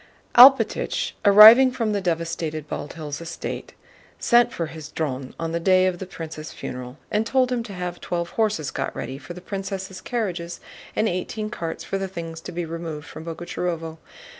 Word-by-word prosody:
Alpátych, 265 +3 +6
arriving 220 +6 +10
from 230 -4 -1
the 205 -1 0
devastated 165 -3 -2
Bald 145 - -5
Hills 150 -2 -6
estate, 170 0 -6 0.4
sent 240 0 +4
for 170 - -3
his 155 -1 -9
Dron 135 -4 -4
on 165 0 -2
the 170 - -1
day 185 +1 +4
of 180 -2 -1
the 190 - -6
prince's 155 -5 -7
funeral 125 +1 -7
and 210 +1 +2
told 255 +2 +1
him 245 -1 0
to 225 -3 -8
have 180 -1 -5
twelve 170 -1 -3
horses 215 -10 0
got - - -3
ready 130 +2 -5
for 175 - -9
the 180 - -9
princess' 190 0 -5
carriages 180 -8 -3 0.4
and 220 - +2
eighteen 215 +4 -3
carts 165 -6 -5
for 195 - -3
the 195 - -2
things 165 -3 -7
to - - -8
be 175 0 -3
removed 165 -2 -6
from 160 - -9
Boguchárovo. 165 -1 -4
175 Hz, 180 wpm, -23 LUFS, 160-205 Hz, 0.4 s, arriving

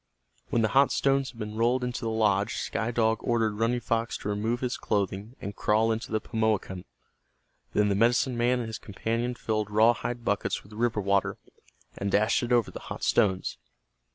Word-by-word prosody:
When 115 - +1
the 110 - +2
hot 135 +1 +5
stones 135 -1 +1
had 120 - -14
been 105 -1 -5
rolled 120 +3 +2
into 125 -1 -3
the 115 - -2
lodge 105 -1 +1
Sky 115 - -2
Dog 115 -2 +1
ordered 110 -3 0
Running 120 +2 +1
Fox 115 0 -1
to - - -5
remove 110 +4 -1
his 125 -1 -1
clothing 100 +3 -2
and 100 0 -6
crawl 110 +2 +2
into 110 0 -3
the 110 - +1
Pimoakan. 110 -5 -1 0.9
Then 105 0 +3
the - - +2
medicine 120 +4 +2
man 120 +2 +2
and 120 - -3
his 110 - -6
companion 115 +4 -2
filled 110 -3 -2
raw 110 +3 +5
hide 120 0 -5
buckets 100 - -1
with 105 - -16
river 115 -1 0
water, 100 0 +1 0.6
and 100 0 -3
dashed 105 +3 +3
it 120 0 -3
over 120 -2 +3
the - - -7
hot - - -6
stones. 95 -3 +1
110 Hz, 190 wpm, -27 LUFS, 105-120 Hz, 0.9 s, hot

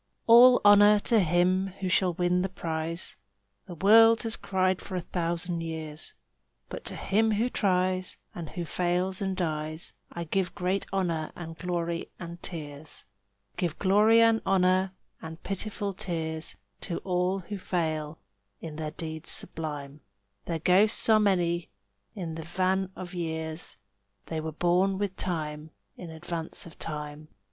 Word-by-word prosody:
"All 245 +2 +8
honor 205 +1 +8
to 230 +1 +3
him 180 +2 +2
who 190 - -2
shall 185 -1 +2
win 180 +1 +2
the 190 - -1
prize," 165 -1 -4 0.5
The 175 - -7
world 225 +6 +6
has 225 -1 0
cried 185 -1 0
for 190 - -7
a 180 - -1
thousand 170 0 -2
years; 160 -1 -5 0.5
But - - -7
to - - -4
him 220 +2 +1
who 225 +4 +1
tries, 185 -3 0 0.2
and 170 -3 -6
who 175 -2 -5
fails 180 +3 0
and 190 -1 -1
dies, 155 -2 -3 0.2
I 170 - -4
give 180 +2 -1
great 185 +2 -1
honor 170 -5 -1
and 165 -2 -7
glory 170 -1 -3
and 170 0 -8
tears; 150 -3 -7 0.5
Give 170 -4 -1
glory 210 +4 +5
and 230 -1 +4
honor 185 0 +2 0.3
and 160 +1 -9
pitiful 200 0 -3
tears 160 -3 -3 0.3
To 170 - -3
all 180 0 +1
who 200 +3 -6
fail 160 -4 -2 0.4
in 155 -2 -7
their 155 -1 -3
deeds 160 +1 -6
sublime; 150 -2 -3 0.4
Their 165 - -2
ghosts 190 +7 +4
are 220 -1 +7
many 175 -4 +1 0.5
in 175 -5 -4
the 160 - -5
van 185 +3 0
of 185 0 -8
years, 160 -1 -3 0.5
They 160 -1 -3
were 160 0 -4
born 180 +4 +2
with 200 -1 -2
Time, 155 -3 -3 0.3
in 175 - -9
advance 165 0 -5
of 165 - -14
Time. 150 -1 -6
175 Hz, 150 wpm, -28 LUFS, 160-190 Hz, 0.5 s, All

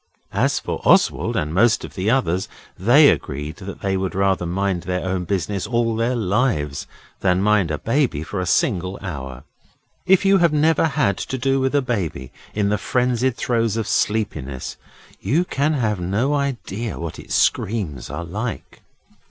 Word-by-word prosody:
As - - +2
for - - -4
Oswald - - +3
and 75 +1 -1
most 110 +5 +3
of - - -11
the 95 +2 -1
others, 95 -8 +1 0.3
they 125 - +6
agreed 75 +3 -2
that 100 0 -8
they 95 -1 0
would 95 -1 -2
rather 95 -2 +1
mind 95 0 -1
their 90 +1 -3
own 95 -1 -1
business 100 +1 -2
all 115 -1 +1
their 115 +3 0
lives 100 - 0 0.3
than 90 -1 +2
mind 105 -5 +3
a 75 - -1
baby 115 - 0
for 95 +4 -5
a 90 - -2
single 90 +2 +1
hour. 65 -8 -6 0.6
If 190 +1 +4
you 195 0 +5
have 170 -2 +3
never 155 +2 +3
had 140 -9 0
to 130 - -3
do 135 +1 +1
with 130 +1 0
a 140 - +3
baby 95 - -3 0.2
in 105 -1 +1
the 105 0 0
frenzied 125 +1 0
throes 115 -2 0
of 110 - -1
sleepiness 80 - -1 0.4
you 165 +7 +1
can 150 -1 0
have 110 -8 0
no 105 +11 0
idea 120 -6 -3
what 85 -1 -6
its - - -4
screams 95 - 0
are 85 - -5
like. 105 +7 -5
105 Hz, 170 wpm, -21 LUFS, 90-125 Hz, 0.6 s, they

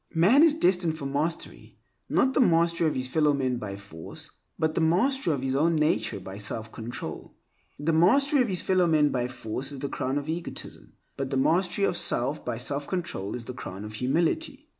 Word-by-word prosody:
Man 195 - +6
is 320 -2 +5
destined 180 - +2
for 140 - -6
mastery; 145 +4 -3 0.3
not 265 +1 +2
the - - +1
mastery 170 -4 +3
of 155 - -1
his 130 0 -1
fellow 150 +2 +2
men 130 -2 0
by 100 -4 -5
force, 100 -5 -8 0.3
but 160 0 0
the 165 - 0
mastery 185 +7 +2
of 140 -3 -2
his 130 0 0
own 160 +5 +2
nature 150 -8 +1
by 95 +1 -8
self 110 +2 -5
control. 115 +2 -7 0.4
The 155 +3 0
mastery 275 - +4
of 245 - +2
his 185 -4 0
fellow 185 -2 +3
men 155 -2 +4
by 125 -2 -1
force 125 +2 -4
is 140 - -7
the 140 +1 -4
crown 135 +1 -2
of 145 +1 -4
egotism, 165 +2 -6 0.2
but 135 -1 -3
the 135 - -1
mastery 180 +7 +2
of 175 - 0
self 135 +5 0
by - - -3
self 140 +4 -2
control 135 - -3
is 120 -2 -6
the 125 - -6
crown 100 -4 -7
of 105 - -8
humility. 175 - -1
150 Hz, 205 wpm, -27 LUFS, 125-175 Hz, 0.4 s, Man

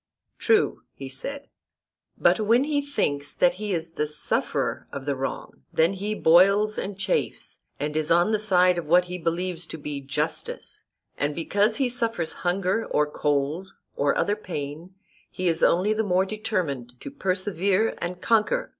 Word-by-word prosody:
True, 440 -2 +2
he 135 - -7
said. 280 - -4 0.7
But - - +3
when 230 +4 +3
he 290 0 0
thinks 145 - -2
that 175 0 +4
he 210 -1 -2
is 165 -2 -2
the 150 -2 -2
sufferer 150 0 -1
of 140 -1 -6
the 140 -1 0
wrong, 130 - -5
then 165 +4 +3
he 205 +2 -3
boils 195 +5 +4
and 195 0 -4
chafes, 465 - -2 0.2
and 150 +1 -3
is 155 0 -1
on 175 +5 +4
the 215 - +2
side 180 -4 +3
of 165 - -7
what 175 +3 +5
he 180 0 -6
believes 170 +1 -2
to 160 - -7
be 145 -2 -5
justice; 135 0 -4 0.3
and 145 +1 0
because 205 +6 +1
he 270 +1 +1
suffers 230 -8 -1
hunger 185 +4 0
or 150 - +2
cold 150 +4 -1 0.3
or 140 0 +1
other 205 - +1
pain 165 -2 -6 0.3
he 185 -1 -3
is 165 -1 +1
only 190 +5 +3
the 220 - 0
more 190 -2 +2
determined 165 - -3
to - - -8
persevere 195 - 0
and 175 +1 -4
conquer. 235 - +2
180 Hz, 165 wpm, -25 LUFS, 155-210 Hz, 0.7 s, what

